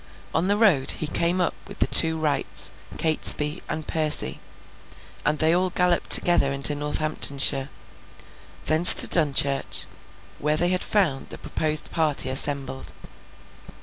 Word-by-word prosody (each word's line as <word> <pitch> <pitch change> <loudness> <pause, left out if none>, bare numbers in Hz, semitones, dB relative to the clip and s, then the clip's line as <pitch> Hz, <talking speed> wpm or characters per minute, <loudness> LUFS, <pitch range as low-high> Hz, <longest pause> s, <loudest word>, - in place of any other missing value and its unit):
On 165 +3 -3
the 205 +1 -2
road, 185 -12 0
he - - -4
came 170 +4 -4
up 180 - -3
with - - -13
the - - -1
two 160 -1 +2
Wrights, 150 -3 -3 0.3
Catesby, 155 0 +3
and 155 -1 -7
Percy; 155 - 0 0.8
and 150 0 -3
they 160 +2 0
all 185 +1 -2
galloped 180 -1 -3
together 175 -6 +6
into 140 +2 +2
Northamptonshire. 145 -2 -1 1.0
Thence 160 +3 +9
to - - +5
Dunchurch, 140 -4 -2 0.5
where 150 +1 -3
they 175 +3 -2
found 180 -9 -4
the - - -11
proposed 155 -1 -5
party 155 -5 -4
assembled. 135 0 -6
155 Hz, 130 wpm, -21 LUFS, 140-170 Hz, 1.0 s, Thence